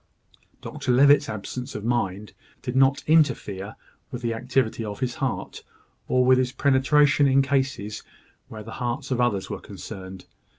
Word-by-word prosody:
Dr - - -3
Levitt's 140 +2 +5
absence 110 +4 -6
of 105 0 -5
mind 105 -4 -2 0.3
did 125 - -4
not 135 +1 +3
interfere 110 -11 +1 0.3
with 125 0 -7
the 115 -1 0
activity 125 -1 -1
of 105 -2 -6
his 125 -2 -2
heart, 130 -2 -4 0.4
or 125 0 +2
with 130 0 +5
his 125 -1 0
penetration 140 +1 +3
in 135 0 +4
cases 130 -6 -2 0.5
where 110 -1 -9
the 110 - -10
hearts 120 +1 -3
of 125 -1 +1
others 105 -6 0
were - - -5
concerned. 95 -1 -9
125 Hz, 155 wpm, -24 LUFS, 110-135 Hz, 0.5 s, Levitt's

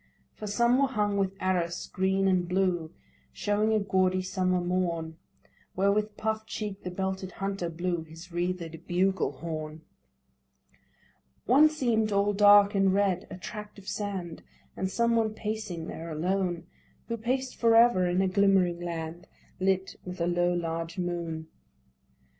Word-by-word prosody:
For 215 - -7
some 235 +5 +3
were 275 - +4
hung 210 -5 0
with 195 -1 0
arras 175 -2 -1
green 190 +1 +1
and 180 -2 +2
blue, 180 -3 0 0.4
Showing 210 +1 0
a 220 - +3
gaudy 185 -2 +1
summer 185 -1 0
morn, 175 -3 -1 0.6
Where 195 +2 +3
with 210 +1 -1
puff'd 220 0 -2
cheek 205 -2 -5
the 180 - -5
belted 190 +1 -3
hunter 195 -3 -3
blew 175 +1 -2
His 165 +3 -12
wreathed 175 -1 -3
bugle 190 0 +1
horn. 155 +1 -6 1.6
One 285 +6 +6
seem'd 235 -8 0
all 200 +1 +2
dark 205 0 +7
and 195 -1 +3
red 195 -2 +1
â - - -7
a - - -10
tract 210 +4 -8
of 200 -1 -14
sand, 190 -5 -4 0.3
And 190 - -2
some 235 +4 +1
one 220 -1 +1
pacing 210 -7 -4
there 165 +1 -7
alone, 175 +2 -1 0.4
Who 230 - -2
paced 255 +3 -2
for 230 -1 +4
ever 230 -6 +5
in 180 +2 +2
a - - +2
glimmering 190 -2 +3
land, 170 -1 -5 0.3
Lit 190 0 0
with 180 0 -7
a 170 - +1
low 175 0 +2
large 165 0 -3
moon. 170 -3 -3
190 Hz, 155 wpm, -28 LUFS, 175-205 Hz, 1.6 s, dark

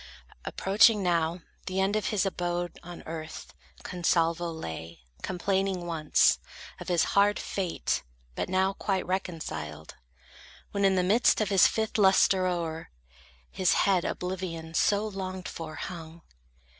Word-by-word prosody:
Approaching 205 +1 +4
now 170 -1 +1 0.3
the 185 +1 -1
end 195 +2 +2
of 215 - 0
his 205 -2 +1
abode 175 -2 -2
On 175 0 -10
earth, 155 - -7 0.3
Consalvo 170 -1 +1
lay; 85 - -7 0.2
complaining 190 0 -1
once, 160 -3 +3 0.4
Of - - -8
his 175 -2 +3
hard 205 +1 +4
fate, 185 -4 -2 0.3
but - - -3
now 190 +1 +2
quite 195 -2 -1
reconciled, 160 - -4 0.7
When, 200 -1 +1
in 190 -1 +4
the 180 - +2
midst 215 +7 +4
of 215 -3 0
his 195 -3 +6
fifth 220 0 -1
lustre, 190 -1 +4
o'er 165 -3 -3 0.6
His 185 -2 +2
head 190 -3 +3
oblivion, 175 -3 -4
so 205 +5 +2
longed 190 -2 -5
for, 155 -1 -7
hung. 165 -2 -8
180 Hz, 130 wpm, -28 LUFS, 165-195 Hz, 0.7 s, his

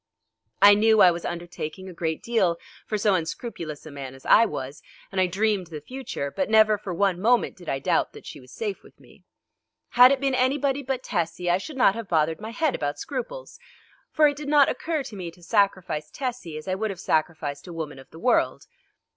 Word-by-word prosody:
I 205 0 +10
knew 220 +1 +4
I 180 - +8
was 170 0 -5
undertaking 175 +1 -6
a 185 - -8
great 160 -2 -3
deal 195 -8 +1 0.3
for 215 - -1
so 205 0 +2
unscrupulous 165 -3 -4
a 155 - -9
man 135 -2 -8
as 135 - -17
I 230 - +6
was, 135 -8 -6 0.3
and 190 -1 0
I 185 - +3
dreamed 200 0 0
the 160 -2 -7
future, 200 - -5
but 280 - -2
never 215 -1 +5
for 195 - -6
one 180 0 0
moment 240 +3 +2
did 175 -4 -10
I 135 - 0
doubt 135 - 0
that - - -13
she - - -9
was 130 0 -16
safe 210 -4 -4
with - - -20
me. - - -20 0.6
Had 250 +2 +7
it 275 - +2
been 275 -1 0
anybody 275 +2 +1
but 265 -1 -3
Tessie 175 +1 -1
I 180 - +2
should 295 +6 -8
not 245 -6 +5
have 230 -2 -7
bothered 160 +1 +1
my 220 - -6
head 290 +4 0
about 145 0 -2
scruples. - - -6 0.5
For 305 -1 +5
it 290 -1 -1
did 295 -1 -6
not 290 -2 +5
occur 315 -3 -2
to 225 - -9
me 180 -3 -5
to 170 +1 -17
sacrifice 185 -6 0
Tessie 245 - -5
as 155 - -9
I 185 - 0
would 215 +3 -2
have 190 -3 -6
sacrificed 155 -1 -1
a 175 - -8
woman 155 -4 -6
of 130 - -15
the - - -14
world. 245 +8 +1
195 Hz, 220 wpm, -25 LUFS, 165-245 Hz, 0.6 s, I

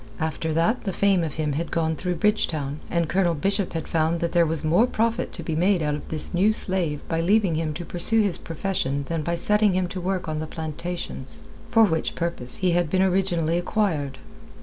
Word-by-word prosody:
After 160 0 -2
that 170 +10 +1
the 195 - -1
fame 195 -3 +3
of 155 -3 -3
him 150 -2 -1
had 165 +4 -2
gone 160 -1 0
through 180 +2 -2
Bridgetown, 155 -7 0
and 170 -1 0
Colonel 175 0 +2
Bishop 195 +4 -1
had 165 - -4
found 165 +1 +1
that 170 0 -1
there 170 -2 +4
was 160 -1 -1
more 175 +10 +4
profit 230 -1 0
to - - -6
be 160 - -2
made 180 +1 +2
out 150 -1 0
of 150 - -6
this 155 +2 -3
new 195 +5 +4
slave 175 -8 0
by 165 0 0
leaving 195 0 +3
him 160 0 -1
to 175 +2 -5
pursue 180 +7 +1
his 200 -4 +1
profession 165 -5 -2
than 165 -1 -1
by 170 +3 -1
setting 210 +3 +3
him 185 -1 +1
to 185 - -5
work 185 -1 -2
on 155 -1 -2
the 155 - -4
plantations, 160 -3 -6 0.3
for 225 -1 +5
which 160 -7 +1
purpose 170 -8 -3
he 180 - +4
had 175 -2 +1
been 185 +3 +2
originally 175 -3 +1
acquired. 165 -8 -1
170 Hz, 215 wpm, -24 LUFS, 160-190 Hz, 0.3 s, for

